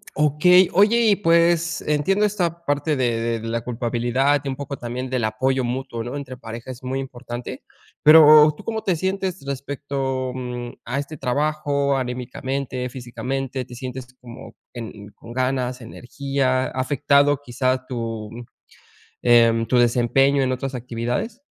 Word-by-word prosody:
Okey, 160 +5 +5
oye, 210 +5 +4
y - - +5
pues, 170 -2 +2
entiendo 160 +8 +1
esta 175 -5 -2
parte 145 +1 0
de 115 -3 0
de 115 - -7
la 115 +1 -2
culpabilidad 120 +4 0
y - - -6
un 135 - -3
poco 140 0 -6
también 125 +2 -5
del 125 -2 -1
apoyo 130 +4 0
mutuo, 125 -1 -3
¿no? 120 +4 -6
Entre 135 -3 -7
pareja 115 +1 -8
es 130 0 -11
muy 130 +1 -2
importante. 125 -2 -7 0.4
Pero, 155 0 +8
¿tú - - -11
cómo 220 -1 -3
te 185 - +1
sientes 190 -2 -3
respecto, 135 -1 -3
mm, 125 -1 -5
a 130 +4 -2
este 145 +2 -6
trabajo, 140 +1 0
anímicamente, 130 +1 -4
físicamente, 130 +1 -4
te 125 - -11
sientes 130 0 -7
como 120 -1 -11 0.2
en 110 -4 -8
con 115 - -12
ganas, 130 0 -1
energía, 130 +2 -2
ha - - -2
afectado 145 +1 +2
quizá 130 0 -1
tu, 115 -4 -5 0.9
em, 115 -1 +4
tu 125 +2 +2
desempeño 125 +4 +3
en 130 -1 +1
otras 135 +1 -4
actividades? 125 - -4
130 Hz, 145 wpm, -22 LUFS, 120-145 Hz, 0.9 s, Pero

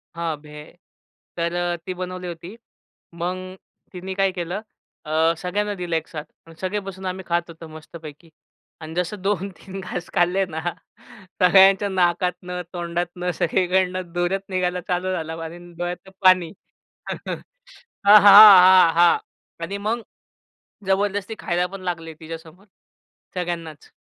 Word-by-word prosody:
हां, 170 -2 -2
भेळ 150 0 -12 0.7
तर 170 0 -1
अ, 175 0 -1
ती 185 - -2
बनवली 185 0 -5
होती. 175 +4 -8 0.6
मग 175 +2 -3 0.6
तिने 185 +1 -6
काय 195 0 +1
केलं 180 +2 -4 0.4
अ, 160 +2 +2
सगळ्यांना 205 +4 -2
दिलं 175 -3 -3
एक 160 0 -2
साथ 150 -3 -7 0.2
मग 165 - -13
सगळे 190 +2 -1
बसून 190 0 -8
आम्ही 185 +1 -4
खात 170 0 -1
होतो 165 0 -11
मस्तपैकी. 155 0 -12 0.5
आणि 160 0 -8
जसं 180 +3 -3
2-3 195 -1 -4
घास 180 -2 -6
खाल्ले 185 +1 +2
ना 160 -1 -5 0.8
सगळ्यांच्या 195 +2 +6
नाकातनं 180 -1 -1
तोंडातनं 175 +1 -3
सगळीकडनं 185 0 0
धुरचं 175 +2 -1
निघायला 180 -1 -1
चालू 180 +1 -1
झालं 165 -2 -4
आणि 165 +1 -7 0.2
डोळ्याचं 175 +2 -5
पाणी 185 -3 +4 1.6
हां, 205 - +9
हां, 205 - +9 0.3
हां, 185 -2 +7
हां 170 0 +5 0.5
आणि 200 +4 -5
मग 230 +1 -1 0.8
जबरदस्ती 200 +2 0
खायला 175 0 -1
पण 195 - -7
लागले 165 -2 -7
तिच्यासमोर. 165 +4 -10 0.7
सगळ्यांनाच. 170 -4 -5
180 Hz, 130 wpm, -22 LUFS, 170-190 Hz, 1.6 s, हां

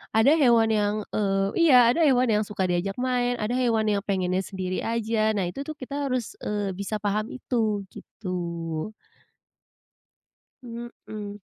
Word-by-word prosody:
Ada 235 +8 +6
hewan 235 -5 +5
yang, 210 -1 +1 0.2
eee 195 -2 +1 0.2
iya, 250 -3 +7
ada 335 - +3
hewan 255 -4 +4
yang 210 0 +2
suka 195 -3 -1
diajak 180 +3 -1
main, 245 -1 0
ada 220 +3 -1
hewan 230 -4 +1
yang 200 -1 0
pengennya 185 -1 0
sendiri 185 -1 -4
aja. 225 -1 0
Nah, 190 -3 0
itu 275 +10 -6
tuh 310 - -5
kita 280 +2 -3
harus, 250 -3 -2
eee, 205 -2 -2
bisa 200 +3 -3
paham 210 +1 0
itu 220 -6 -1
gitu. 170 -2 -5 1.7
Mhm. 225 -3 -8
215 Hz, 145 wpm, -25 LUFS, 195-240 Hz, 1.7 s, iya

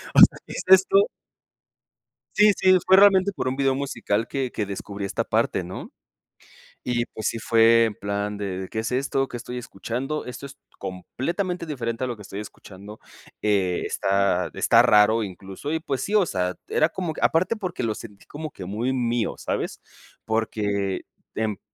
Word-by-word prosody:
o - - +7
sea, - - +8
¿qué - - -8
es - - -4
esto? 190 - +6 1.3
Sí, 210 0 +6
sí, 185 -1 +5
fue 190 - +7
realmente 195 0 +6
por 130 - -2
un 130 - -2
video 135 -1 +2
musical 120 -5 -2
que 135 -3 -2
que 105 - -2
descubrí 100 0 -6
esta 95 - -2
parte, - - 0
¿no? - - -8 0.9
Y 120 -1 0
pues 110 - -5
sí - - -1
fue 115 +1 +5
en 110 - -2
plan 100 +1 -3
de: 95 -2 -4
"¿Qué 110 - -2
es 110 +2 -3
esto?, 135 +1 0
¿qué 120 - -6
estoy 125 +1 -7
escuchando?, 125 +6 -4
esto 125 +3 -7
es 140 +1 -14 0.2
completamente 170 - -4
diferente 115 -5 -3
a - - 0
lo 120 - -3
que 105 - -12
estoy 100 +1 -7
escuchando, 105 0 -11 0.4
eh, 95 -4 +1
está 95 -2 +1
está - - +5
raro 105 +2 +5
incluso", 95 +7 -7
y 160 - 0
pues 135 -5 -3
sí, 205 - -1
o 205 -3 +5
sea, 90 - -2
era 155 - +2
como 175 -2 -4
aparte 180 +7 +2
porque 185 - -4
lo 110 -2 0
sentí 105 -2 -11
como 155 +1 -7
que 95 -10 -9
muy 110 +7 -2
mío, 120 -2 0
¿sabes?, - - -3 0.5
porque 105 -3 -1 0.3
en 110 -2 -2
115 Hz, 175 wpm, -24 LUFS, 100-140 Hz, 1.3 s, sea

